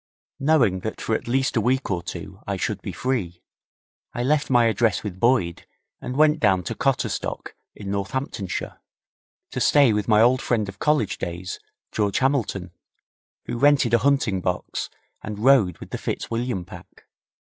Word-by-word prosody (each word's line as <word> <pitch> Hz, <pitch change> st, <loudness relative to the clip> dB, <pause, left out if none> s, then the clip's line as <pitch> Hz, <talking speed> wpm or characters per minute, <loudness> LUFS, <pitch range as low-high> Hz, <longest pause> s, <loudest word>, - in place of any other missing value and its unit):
Knowing 135 Hz, -11 st, +3 dB
that 110 Hz, +4 st, -5 dB
for 110 Hz, -, -2 dB
at -, -, -2 dB
least 130 Hz, +3 st, +1 dB
a 115 Hz, -, +3 dB
week 130 Hz, +1 st, 0 dB
or 90 Hz, -2 st, -1 dB
two 95 Hz, +1 st, -8 dB
I 100 Hz, -1 st, -1 dB
should -, -, -2 dB
be -, -, -5 dB
free, 95 Hz, -10 st, -3 dB, 0.7 s
I 120 Hz, -, -1 dB
left 145 Hz, +2 st, +1 dB
my 120 Hz, -2 st, +5 dB
address 115 Hz, -2 st, +1 dB
with 95 Hz, -3 st, -6 dB
Boyd, 115 Hz, -8 st, +1 dB, 0.3 s
and 125 Hz, -, -5 dB
went 155 Hz, +1 st, +4 dB
down 95 Hz, -10 st, +3 dB
to -, -, -3 dB
Cotterstock, -, -, -2 dB, 0.2 s
in 100 Hz, -2 st, -6 dB
Northamptonshire, 100 Hz, -1 st, -4 dB, 0.7 s
to -, -, -3 dB
stay 140 Hz, -6 st, +5 dB
with 105 Hz, -1 st, -1 dB
my 105 Hz, -2 st, +5 dB
old 125 Hz, +3 st, +4 dB
friend 110 Hz, -4 st, 0 dB
of 100 Hz, +1 st, -9 dB
college 150 Hz, -10 st, +1 dB
days, 90 Hz, +2 st, -5 dB, 0.3 s
George 105 Hz, -2 st, 0 dB
Hamilton, 120 Hz, -, 0 dB, 0.7 s
who 120 Hz, -, -4 dB
rented 145 Hz, -4 st, +4 dB
a 120 Hz, -, +6 dB
hunting 120 Hz, -7 st, +1 dB
box 90 Hz, 0 st, -3 dB, 0.3 s
and 105 Hz, -1 st, -6 dB
rode 110 Hz, -6 st, +4 dB
with -, -, -11 dB
the -, -, -4 dB
Fitzwilliam 115 Hz, -5 st, -3 dB
Pack. -, -, -14 dB
115 Hz, 165 wpm, -23 LUFS, 95-130 Hz, 0.7 s, a